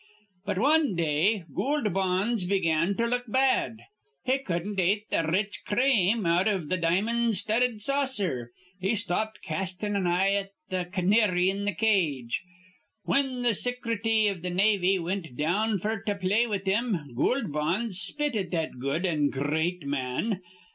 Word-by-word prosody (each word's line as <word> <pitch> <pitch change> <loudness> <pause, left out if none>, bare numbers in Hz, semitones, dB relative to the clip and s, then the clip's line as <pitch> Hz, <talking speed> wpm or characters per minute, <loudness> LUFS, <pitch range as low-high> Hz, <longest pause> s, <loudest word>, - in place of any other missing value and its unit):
"But 200 -3 -2
wan 290 - +3
day 170 +5 +1
Goold 270 - 0
Bonds 190 +3 0
begun 175 -1 +1
to 235 - +1
look 245 +1 -1
bad. 260 -2 +1 0.4
He 260 +2 +2
cudden't 195 -3 -3
ate 205 +4 +1
th' - - +2
r 165 -1 0
rich 200 +4 -1
crame 220 -3 +2
out 175 +4 +3
iv 190 -8 -1
th' 185 -2 -1
di'mon' 220 +7 +1
studded 220 +2 0
saucer. 210 - -1 0.3
He 195 +4 0
stopped 215 +1 -2
castin' 190 +5 -3
an 190 -3 0
eye 185 +3 +2
at 200 -1 -1 0.2
th' 180 -1 -2
c'nary 190 -1 +3
in 200 +1 -4
th' 170 - -15
cage. 160 - +1 0.6
Whin 265 -3 0
th' 235 -3 +2
Sicrety 230 -2 +1
iv 195 -4 -1
th' 180 +1 -3
Navy 195 0 +3
wint 170 -6 -4
down 205 +8 +1
f'r 215 +2 -3
to 205 -2 0
play 200 +5 +1
with 200 -3 -3
him, 190 - -1
Goold 230 - 0
Bonds 180 +7 0
spit 295 -1 -1
at 190 -5 -2
that 160 -7 -3
good 140 +8 -1
an' 150 -5 +1
gr 140 +2 -2
reat 170 +2 -1
man. 140 - -2
195 Hz, 160 wpm, -27 LUFS, 175-225 Hz, 0.6 s, wan